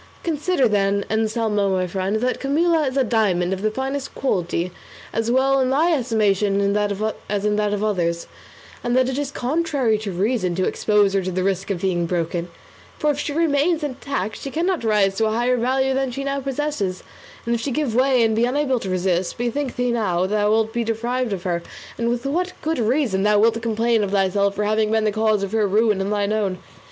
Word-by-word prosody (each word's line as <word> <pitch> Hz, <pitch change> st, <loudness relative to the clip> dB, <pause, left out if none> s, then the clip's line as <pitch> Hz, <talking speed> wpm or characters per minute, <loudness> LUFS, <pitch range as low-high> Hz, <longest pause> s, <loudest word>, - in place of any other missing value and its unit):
Consider, 310 Hz, -3 st, +1 dB
then, 200 Hz, -1 st, +1 dB
Anselmo 220 Hz, -2 st, +1 dB
my 185 Hz, -1 st, +1 dB
friend, 190 Hz, +3 st, -2 dB
that 250 Hz, +1 st, 0 dB
Camilla 315 Hz, +2 st, +2 dB
is 260 Hz, +1 st, -3 dB
a 270 Hz, -, +4 dB
diamond 195 Hz, -6 st, +1 dB
of 190 Hz, -, -4 dB
the 215 Hz, -, +1 dB
finest 265 Hz, +4 st, -4 dB
quality 180 Hz, -7 st, -1 dB, 0.4 s
as 225 Hz, +1 st, -1 dB
well 270 Hz, +2 st, +3 dB
in 255 Hz, -, +1 dB
thy 320 Hz, +6 st, +3 dB
estimation 210 Hz, -6 st, +1 dB
as 205 Hz, 0 st, -1 dB
in 210 Hz, 0 st, +2 dB
that 210 Hz, -1 st, +1 dB
of 205 Hz, 0 st, -1 dB
others, 170 Hz, -5 st, 0 dB, 0.6 s
and 240 Hz, +1 st, +1 dB
that 255 Hz, 0 st, +3 dB
it 265 Hz, +1 st, -2 dB
is 290 Hz, -2 st, -2 dB
contrary 275 Hz, -5 st, 0 dB
to 210 Hz, -2 st, -4 dB
reason 185 Hz, -1 st, 0 dB
to 185 Hz, +1 st, 0 dB
expose 205 Hz, -2 st, +2 dB
her 195 Hz, -, +2 dB
to 185 Hz, 0 st, -3 dB
the 185 Hz, +1 st, -1 dB
risk 195 Hz, 0 st, -1 dB
of 185 Hz, -4 st, -2 dB
being 175 Hz, -3 st, 0 dB
broken; 170 Hz, 0 st, -2 dB, 0.5 s
for 300 Hz, -, +2 dB
if 290 Hz, -, -4 dB
she 295 Hz, -, -2 dB
remains 310 Hz, +1 st, +1 dB
intact 260 Hz, -7 st, -3 dB
she 275 Hz, -, -6 dB
cannot 345 Hz, +2 st, -1 dB
rise 205 Hz, -3 st, +2 dB
to 220 Hz, -, +2 dB
a -, -, 0 dB
higher 240 Hz, +2 st, +2 dB
value 265 Hz, +2 st, +1 dB
than 265 Hz, 0 st, 0 dB
she 275 Hz, +3 st, -5 dB
now 275 Hz, 0 st, -1 dB
possesses; 270 Hz, -8 st, -3 dB, 0.4 s
and 235 Hz, -, 0 dB
if 235 Hz, -, -1 dB
she 280 Hz, -, -2 dB
give 275 Hz, -3 st, -1 dB
way 255 Hz, 0 st, +3 dB
and 220 Hz, -1 st, +2 dB
be 230 Hz, +2 st, +3 dB
unable 265 Hz, 0 st, 0 dB
to 195 Hz, -, -5 dB
resist, 185 Hz, -1 st, 0 dB
bethink 245 Hz, +3 st, -2 dB
thee 245 Hz, 0 st, 0 dB
now 200 Hz, -7 st, 0 dB
how -, -, +2 dB
thou 210 Hz, +1 st, +1 dB
wilt 220 Hz, 0 st, +1 dB
be 235 Hz, -1 st, 0 dB
deprived 235 Hz, +2 st, -2 dB
of 185 Hz, -3 st, -3 dB
her, 175 Hz, -2 st, -1 dB, 0.4 s
and 235 Hz, 0 st, 0 dB
with 240 Hz, +2 st, -2 dB
what 360 Hz, +6 st, -1 dB
good 320 Hz, -1 st, -1 dB
reason 235 Hz, -4 st, +1 dB
thou 210 Hz, +1 st, +3 dB
wilt 230 Hz, +2 st, +3 dB
complain 225 Hz, 0 st, +1 dB
of 200 Hz, -, -1 dB
thyself 200 Hz, 0 st, +1 dB
for 210 Hz, -, -1 dB
having 215 Hz, +1 st, +1 dB
been 220 Hz, 0 st, +1 dB
the 215 Hz, -, +2 dB
cause 215 Hz, -1 st, +1 dB
of 195 Hz, -, -3 dB
her 220 Hz, -2 st, +2 dB
ruin 210 Hz, 0 st, +2 dB
and 195 Hz, +2 st, -2 dB
thine 205 Hz, 0 st, 0 dB
own. 200 Hz, -4 st, -1 dB
220 Hz, 215 wpm, -22 LUFS, 200-260 Hz, 0.6 s, a